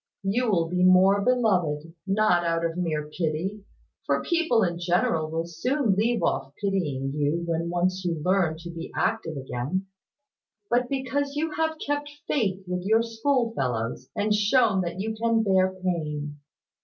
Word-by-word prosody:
You 225 +5 +1
will 170 -5 +2
be 180 +2 0
more 185 +2 +6
beloved; 180 -10 +1
not 195 -3 +3
out 165 0 0
of 165 0 -2
mere 155 -4 -2
pity; 165 +6 -3 0.4
for - - +1
people 330 -10 +2
in 170 -2 -1
general 170 -2 +1
will 165 +1 -2
soon 230 - 0
leave 225 +4 +1
off 135 0 -1
pitying 150 -10 -1
you, 150 +3 0
when 165 0 -1
once 185 +2 0
you 170 -3 -1
learn 180 -4 +2
to 170 - -6
be 165 0 -7
active 210 -9 -1
again; 135 +8 -3 0.9
but 245 +1 +2
because 280 +1 -2
you 315 +2 -1
have 320 0 -1
kept 290 -1 -2 0.2
faith 195 -8 0
with 180 0 -2
your 220 +4 +3
schoolfellows, 225 - -1
and 210 +1 +1
shown 210 -1 +3
that 170 +1 -4
you 220 +3 -2
can 225 0 +1
bear 190 -2 +3
pain. 150 -6 -3
185 Hz, 155 wpm, -26 LUFS, 165-225 Hz, 0.9 s, more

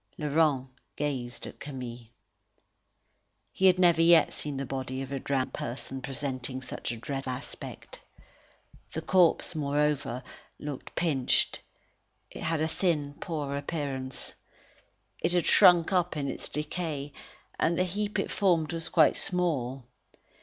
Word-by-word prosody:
Laurent 150 -3 +2 0.3
gazed 130 -5 -3
at - - -10
Camille. 125 -4 -7 1.4
He 190 - +3
had 185 -1 +6
never 170 -2 +5
yet 165 -1 +6
seen 145 -2 -4
the 135 - -2
body 130 0 -4
of 135 - -8
a 135 - -2
drowned 130 -1 -1
person 130 +2 -5
presenting 130 -1 -4
such 125 - -4
a 120 - -5
dreadful 135 +2 -3
aspect. 130 +3 -7 0.9
The - - -3
corpse, 180 -1 +4
moreover, 145 -4 0 0.3
looked 145 -3 -7
pinched. 145 -7 +2 0.7
It - - -9
had 160 -1 0
a 160 - +2
thin, 155 -4 0
poor 150 -4 -3
appearance. 140 -3 -3 0.9
It 170 - +2
had 175 -2 +2
shrunk 175 0 +6
up 180 -3 +1
in 140 -1 -1
its - - -4
decay, 150 -1 -3 0.5
and 170 0 +2
the 185 - +3
heap 205 +3 -2
it - - -1
formed 175 -5 +2
was 165 -1 -3
quite 155 -3 +5
small. 135 -9 0
145 Hz, 135 wpm, -29 LUFS, 130-165 Hz, 1.4 s, had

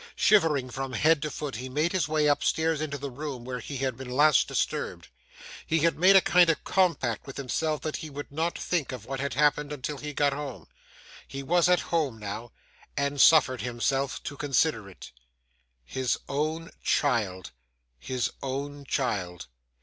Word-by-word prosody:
Shivering 150 -11 +3
from 135 +1 -4
head 150 +6 +3
to 150 - -2
foot, 145 -5 -5
he 130 +2 -6
made 150 +6 0
his 180 -7 0
way 155 -1 +1
upstairs 160 +2 +1
into 145 -2 -3
the 140 0 -6
room 135 -2 -6
where 125 0 -4
he 135 +4 -6
had 130 -1 -1
been 130 0 -8
last 145 +3 +4
disturbed. - - -2 0.6
He 165 -1 +1
had 165 +1 +3
made 185 +4 +6
a 195 - +8
kind 180 -1 +5
of 165 - +1
compact 170 - +1
with 135 - -8
himself 150 +3 -1
that 155 - -3
he 155 - -7
would 145 0 -8
not 160 +4 -1
think 170 -6 -1
of 125 -4 -7
what 135 0 -4
had 140 -1 -2
happened 150 0 +2
until 145 0 -4
he 150 0 -5
got 145 -1 +1
home. 140 -3 -6 0.6
He 135 0 -6
was 175 +4 +3
at 180 - +4
home 145 -9 +1
now, 110 +3 -6 0.5
and 140 0 +1
suffered 140 -6 +6
himself 130 +3 -1
to 140 - -5
consider 140 -6 0
it. 95 - -12 0.7
His 130 - -1
own 155 +3 -2
child, 105 - 0 0.5
his 125 - -2
own 140 +1 -4
child! 95 -10 -2
140 Hz, 175 wpm, -27 LUFS, 130-155 Hz, 0.7 s, a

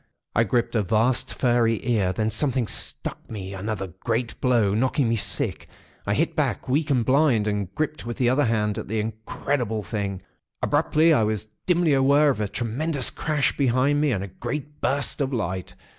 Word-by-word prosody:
I 115 - +4
gripped 120 +2 0
a 110 - +3
vast, 120 +5 +1
furry 120 -2 +2
ear. 105 -6 +2
Then 110 +4 -1
something 130 +1 +1
struck - - -3
me 100 -3 -6
another 95 +1 -3
great 115 +1 -2
blow, 115 -6 +3
knocking 130 +4 +1
me 115 - +1
sick. 110 - 0 0.4
I - - +1
hit - - 0
back, - - -1
weak 145 +4 +1
and 125 -5 +2
blind, 130 -6 +3
and 100 -3 -2
gripped 155 0 -2
with 120 0 -6
my 125 - +3
other 135 +3 +2
hand 105 -2 0
at - - -7
the 110 +2 -1
incredible 110 +1 -2
thing. 100 -4 -4 0.4
Abruptly, 155 +2 +3
I 140 - +3
was 110 0 -1 0.2
dimly 175 -4 +3
aware 140 +2 +4
of 110 - -3
a 105 - 0
tremendous 130 +7 0
crash 150 -3 0
behind 140 +2 +2
me, 150 -2 +2
and 100 -5 -1
a - - -5
great 140 - -6
burst 140 +2 0
of 135 -1 0
light. 95 -7 -3
120 Hz, 185 wpm, -24 LUFS, 110-140 Hz, 0.4 s, I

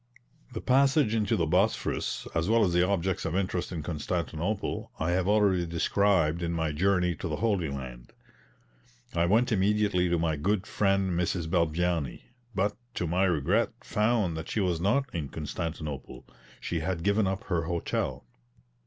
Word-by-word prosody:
The 110 - -4
passage 135 -2 +3
into 110 0 +1
the 85 - +1
Bosphorus, 80 - 0
as 80 +4 0
well 115 -1 +4
as 90 - 0
the 90 - +4
objects 95 0 0
of 80 +1 -2
interest 95 -2 -1
in 80 -4 -4
Constantinople, 85 +4 -3
I 80 +2 0
have 90 +1 +1
already 100 -4 +3
described 85 -1 +2
in 85 0 -1
my 80 -2 0
journey 90 +2 +2
to - - -4
the 75 - -2
Holy 100 -5 0
Land. 65 -3 -7 1.0
I 85 0 +2
went 115 +7 +3
immediately 100 -3 +2
to 85 - +2
my 80 -2 0
good 100 +6 0
friend 95 -3 +1
Mrs. 85 -1 -1
Balbiani; 85 -3 0 0.3
but, 100 +2 +1 0.2
to 90 - -1
my 90 +4 +2
regret, 90 +8 +1
found 105 -5 +1
that 80 - -6
she - - -1
was 90 -4 0
not 115 +9 +2
in 75 -5 -3
Constantinople; 75 -2 -5 0.3
she 85 - -2
had 80 +1 -2
given 100 0 +2
up 95 +4 -2
her 85 -7 -1
hotel. 85 0 -2
90 Hz, 160 wpm, -28 LUFS, 80-100 Hz, 1.0 s, well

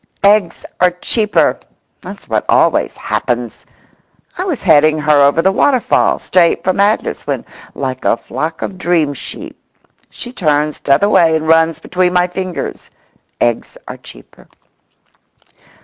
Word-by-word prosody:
"Eggs 200 -2 +2
are 180 - +4
cheaper!" 210 +4 0 0.4
That's - - -11
what - - -1
always - - +2
happens! - - -3 0.7
I 365 - -3
was 335 -9 -3
heading 155 -2 +4
her 150 -1 +3
over 145 +4 +3
the 190 - +3
waterfall, 255 +5 +2
straight 175 -2 +1
for 185 - +1
madness, 205 +3 -1
when, - - -3 0.3
like 130 -2 -4
a - - +2
flock 155 +8 -5
of 185 - -6
dream 165 -6 +1
sheep, - - -9 0.5
she 245 0 -10
turns 150 - 0
t'other 140 +9 +2
way 165 -6 +3
and 160 0 -2
runs 165 0 +3
between 180 0 -1
my 180 0 +3
fingers. 180 0 -6 0.5
Eggs 120 -1 -1
are - - -7
cheaper. - - -16
170 Hz, 135 wpm, -15 LUFS, 150-190 Hz, 0.7 s, are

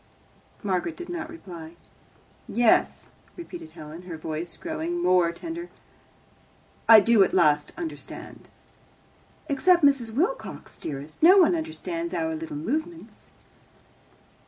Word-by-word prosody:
Margaret 195 - -1
did 350 - -8
not 325 -2 -5
reply. 175 - -10 0.7
"Yes," 235 -2 +2 0.3
repeated 340 -1 -9
Helen, 155 +3 -10
her 165 - -5
voice 160 +2 -5
growing 330 +1 -3
more 180 - +3
tender, 335 - -7 1.2
"I 225 -1 +11
do 215 -1 +5
at - - -1
last 150 -5 +3
understand." 330 -1 -8 1.0
"Except 340 +4 +3
Mrs. 265 -5 +3
Wilcox, 360 - -3
dearest, 145 +1 -7
no 360 +5 +8
one 360 -2 +6
understands 335 +1 -4
our 160 -1 -1
little 155 -2 -6
movements." 315 - -5
270 Hz, 110 wpm, -26 LUFS, -, 1.2 s, I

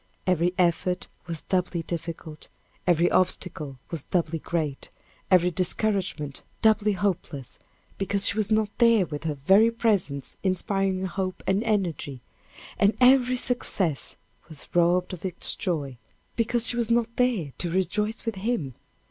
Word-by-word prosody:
Every 180 -1 +2
effort 180 0 +1 0.2
was 165 -2 -3
doubly 180 -2 0
difficult; 165 -2 -6 0.4
every 175 0 +3
obstacle 160 -6 0
was 165 -5 -3
doubly 165 -2 0
great; 155 -4 -3 0.4
every 180 -1 +5
discouragement 180 -5 -1 0.2
doubly 215 -1 +4
hopeless, 180 - -3 0.4
because 200 0 +2
she - - +2
was 215 -1 0
not 215 -1 +1
there 230 -5 +5
with 150 -1 -7
her 155 -2 -1
very 195 +11 +5
presence 200 - -1
inspiring 190 0 0
hope 185 0 -3
and 195 +3 +1
energy 175 - -1 0.6
and 200 +2 +3
every 255 0 +5
success 200 - -1 0.3
was 155 -3 -4
robbed 175 +2 +3
of 180 - -8
its 185 -3 0
joy, 145 - -3 0.4
because 235 0 +1
she 240 +1 -1
was 235 -1 0
not 235 0 +1
there 225 - +1
to 175 - -1
rejoice 210 +6 -1
with 225 -4 -2
him. 190 - -2
185 Hz, 140 wpm, -26 LUFS, 165-215 Hz, 0.6 s, every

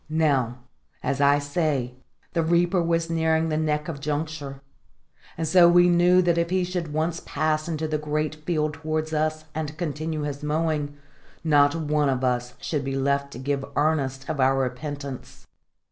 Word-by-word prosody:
Now, 140 -7 +1 0.5
as 140 0 -1
I 140 0 +5
say, 145 -4 -1 0.4
the 165 - +2
reaper 175 +2 +2
was 165 0 0
nearing 160 -1 +1
the 155 - 0
neck 150 -1 0
of 160 -4 -5
juncture; 145 -1 -4 0.8
and 160 0 -2
so 175 +1 +7
we 175 0 +6
knew 175 +1 +5
that 170 -1 +2
if 170 0 0
he 185 0 +1
should 175 -3 -3
once 160 +2 -1
pass 155 +1 -1
into 160 -1 -2
the 155 -1 -1
great 150 +1 -1
field 155 -2 0
towards 155 0 -3
us 155 0 -1
and 155 -1 -4
continue 155 -2 -3
his 145 -1 -4
mowing, 150 -1 -1 0.5
not 145 -2 +4
one 150 -2 +1
of 130 -1 -1
us 125 -1 -1
should 150 -3 -2
be 135 0 -3
left 140 +1 0
to - - -8
give 135 +1 -2
earnest 135 -3 0
of 145 - -3
our 135 +1 +3
repentance. 135 +1 -5
155 Hz, 170 wpm, -25 LUFS, 140-160 Hz, 0.8 s, so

